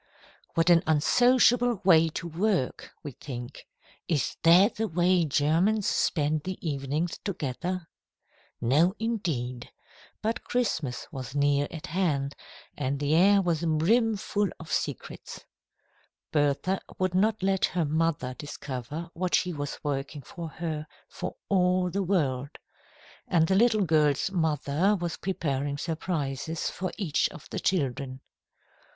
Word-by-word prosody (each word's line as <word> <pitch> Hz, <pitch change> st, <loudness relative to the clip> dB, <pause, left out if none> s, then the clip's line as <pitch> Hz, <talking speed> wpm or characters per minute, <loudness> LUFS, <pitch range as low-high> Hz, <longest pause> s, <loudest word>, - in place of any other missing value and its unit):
"What 165 Hz, +1 st, +4 dB
an 170 Hz, -1 st, +6 dB
unsociable 245 Hz, -, +4 dB
way 165 Hz, -3 st, +6 dB
to 165 Hz, -, -5 dB
work," 175 Hz, -3 st, -1 dB
we 145 Hz, -, -5 dB
think. 125 Hz, 0 st, -8 dB, 0.4 s
"Is 150 Hz, -6 st, 0 dB
that 180 Hz, +7 st, +6 dB
the 220 Hz, 0 st, 0 dB
way 175 Hz, 0 st, +2 dB
Germans 165 Hz, +9 st, +2 dB
spend 155 Hz, -1 st, +1 dB
the 185 Hz, +4 st, -5 dB
evenings 145 Hz, +4 st, -2 dB
together?" 175 Hz, +1 st, -3 dB, 0.7 s
No, 150 Hz, -, +3 dB
indeed. 160 Hz, -, -3 dB, 0.5 s
But 225 Hz, +3 st, -1 dB
Christmas 160 Hz, -, -1 dB
was 130 Hz, -3 st, -7 dB
near 145 Hz, 0 st, +2 dB
at 160 Hz, -2 st, -7 dB
hand, 150 Hz, -5 st, -1 dB, 0.4 s
and 140 Hz, -1 st, -2 dB
the 145 Hz, +1 st, 0 dB
air 195 Hz, +4 st, +5 dB
was 170 Hz, -2 st, 0 dB
brimful 205 Hz, +5 st, +2 dB
of 165 Hz, -, -9 dB
secrets. -, -, -4 dB, 0.9 s
Bertha 150 Hz, +6 st, +1 dB, 0.2 s
would 185 Hz, -1 st, 0 dB
not 210 Hz, +2 st, +2 dB
let 195 Hz, 0 st, +2 dB
her 175 Hz, -3 st, -1 dB
mother 150 Hz, -4 st, 0 dB
discover 145 Hz, +3 st, -6 dB
what 180 Hz, +1 st, 0 dB
she 180 Hz, -1 st, 0 dB
was 145 Hz, -2 st, -4 dB
working 140 Hz, 0 st, -3 dB
for 165 Hz, +5 st, -7 dB
her, 155 Hz, -2 st, -4 dB, 0.2 s
for -, -, -6 dB
all 180 Hz, -1 st, +2 dB
the 200 Hz, -, -1 dB
world. 145 Hz, -7 st, -1 dB, 0.7 s
And 165 Hz, -2 st, +3 dB
the 190 Hz, -, +2 dB
little 215 Hz, 0 st, +4 dB
girl's 150 Hz, +1 st, +2 dB
mother 160 Hz, +2 st, +1 dB
was 170 Hz, -1 st, -3 dB
preparing 145 Hz, -6 st, -2 dB
surprises 160 Hz, -2 st, -3 dB
for 185 Hz, -1 st, -4 dB
each 175 Hz, -9 st, +1 dB
of 170 Hz, -, -12 dB
the -, -, -2 dB
children. 135 Hz, -6 st, -1 dB
165 Hz, 130 wpm, -28 LUFS, 145-185 Hz, 0.9 s, an